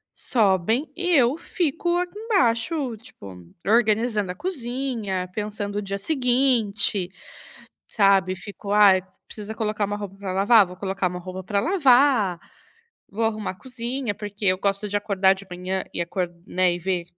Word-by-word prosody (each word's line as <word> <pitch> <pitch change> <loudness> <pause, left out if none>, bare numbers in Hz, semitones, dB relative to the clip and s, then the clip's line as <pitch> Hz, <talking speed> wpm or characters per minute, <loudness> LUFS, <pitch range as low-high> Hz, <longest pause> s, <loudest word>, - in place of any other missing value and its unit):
sobem 220 - +1
e 360 0 -1
eu 255 +3 +3
fico 345 0 -1
aqui 360 +3 -3
embaixo, 280 - 0
tipo, 100 - -13 0.2
organizando 215 -2 +2
a - - -8
cozinha, 240 - -3
pensando 205 -1 -4
o - - 0
dia 200 -1 -4
seguinte, 235 - +1 0.8
sabe, 195 -3 +3
fico: 200 +1 -7
"Aí, 200 -3 +6 0.2
precisa 215 0 -8
colocar 215 -1 -1
uma 205 +1 -3
roupa 200 -2 -7
pra 195 -2 -4
lavar”, 205 +2 +5
vou 180 0 -11
colocar 190 0 -1
uma 180 0 -6
roupa 185 +1 -7
pra 200 +1 0
lavar, 260 - +4 0.7
vou 225 +3 -2
arrumar 215 -2 -1
a - - -15
cozinha. 245 0 -4
Porque 205 0 -6
eu 185 0 +4
gosto 200 +1 -1
de 205 - -1
acordar 195 -2 +2
de 195 0 -12
manhã 185 +1 -3
e - - -2
acor 175 +1 -2 0.2
né, 185 -1 +2
e - - -5
ver 180 0 -2
205 Hz, 155 wpm, -24 LUFS, 190-245 Hz, 0.8 s, Aí